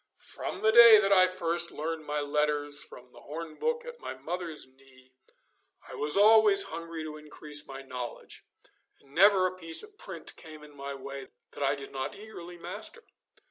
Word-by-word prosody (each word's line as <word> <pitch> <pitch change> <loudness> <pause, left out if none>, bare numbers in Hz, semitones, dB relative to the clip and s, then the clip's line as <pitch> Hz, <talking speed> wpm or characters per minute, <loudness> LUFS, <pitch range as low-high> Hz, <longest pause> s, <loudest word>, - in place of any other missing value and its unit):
From - - -5
the 220 - +4
day 235 -1 +10
that 200 -1 +1
I 185 -2 +6
first 170 -1 -1
learned 155 0 -5
my 150 0 -1
letters 145 0 0
from 125 0 -11
the - - -13
horn 160 +2 -7
book 475 0 -1
at 480 0 -9
my - - -6
mother's 165 +3 -5
knee 130 -1 -22 0.7
I - - -11
was 150 +4 +2
always 210 -1 +7
hungry 165 -1 -6
to 155 -1 -7
increase 150 -1 -6
my 135 0 -8
knowledge, 125 -2 -7 0.6
and 140 0 -23
never 190 +2 +6
a 185 0 -1
piece 165 - 0
of 425 -1 -15
print - - -7
came 155 -1 -12
in 150 -1 -15
my 140 0 -6
way 135 0 -8 0.2
that - - -10
I 140 0 +2
did 140 -1 -10
not 135 +1 -4
eagerly 180 -5 -10
master. 465 - -6
155 Hz, 180 wpm, -29 LUFS, 140-185 Hz, 0.7 s, day